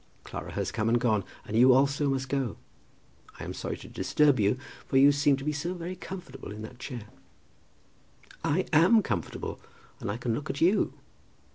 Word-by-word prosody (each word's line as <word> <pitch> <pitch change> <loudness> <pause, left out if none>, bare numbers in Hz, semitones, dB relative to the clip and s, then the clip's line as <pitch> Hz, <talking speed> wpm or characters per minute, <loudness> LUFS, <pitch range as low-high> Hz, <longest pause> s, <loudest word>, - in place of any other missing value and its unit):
Clara - - -7
has - - -2
come 110 0 0
and 120 +1 +3
gone, 110 -5 +2 0.2
and 105 - -5
you 125 +3 +7
also 140 +2 +3
must 135 -1 -1
go. 135 -4 -1 0.8
I - - -6
am - - -5
sorry - - -4
to - - -11
disturb 145 -4 +2
you, 105 +4 +3 0.3
for 135 - +2
you 140 +2 +8
seem 145 -1 +3
to 135 - -7
be 150 - 0
so 170 +5 -3
very 175 +1 -5
comfortable 180 - -8
in 105 +1 -7
that 120 +3 -10
chair." 120 -4 -6 1.4
"I 175 +6 +1
am 185 +8 +6
comfortable, 85 - -3 0.4
and - - -4
I 100 - -2
can 120 -1 -1
look 145 +7 -4
at 140 - -3
you. 185 +5 +3
135 Hz, 185 wpm, -28 LUFS, 120-150 Hz, 1.4 s, you